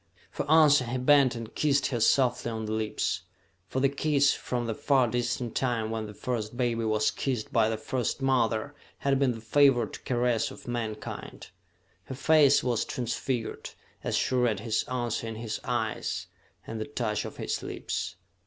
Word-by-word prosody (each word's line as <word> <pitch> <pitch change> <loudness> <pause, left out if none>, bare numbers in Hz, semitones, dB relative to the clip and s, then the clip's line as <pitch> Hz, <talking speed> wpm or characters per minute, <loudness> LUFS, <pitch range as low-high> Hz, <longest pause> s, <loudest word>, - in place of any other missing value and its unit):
For 145 - -4
answer 150 -4 +6
he 120 +2 -2
bent 135 0 +4
and 115 -1 -7
kissed 145 -2 +2
her 120 -4 -1
softly 125 +1 +3
on 110 -1 -4
the 105 - -4
lips 110 -1 -1 0.5
for 130 - -2
the 135 - +4
kiss, 140 0 +2
from 120 -1 -3
the 115 - -1
far 130 +2 +2
distant 120 0 -2
time 115 -4 0
when 110 -1 -3
the 105 - -9
first 120 -1 -3
baby 120 -2 0
was 110 -1 +2
kissed 125 -6 -3
by 110 -1 +4
the 110 - -1
first 125 +3 -2
mother, 130 -1 +1 0.2
had 135 -1 +1
been 135 -3 +2
the 115 - -8
favored 125 -1 +3
caress 120 -2 +1
of - - -12
mankind. 115 -3 -5 0.5
Her 130 - -6
face 145 0 +5
was 120 -3 +1
transfigured 120 -1 -3 0.3
as - - 0
she - - 0
read 120 -5 +2
his 110 -1 0
answer 120 -2 -2
in 115 - -5
his 110 -1 -4
eyes, - - -2 0.4
and 110 -1 -5
the - - -2
touch 110 -7 -2
of - - -8
his - - -2
lips. - - -4
120 Hz, 175 wpm, -28 LUFS, 110-135 Hz, 0.5 s, answer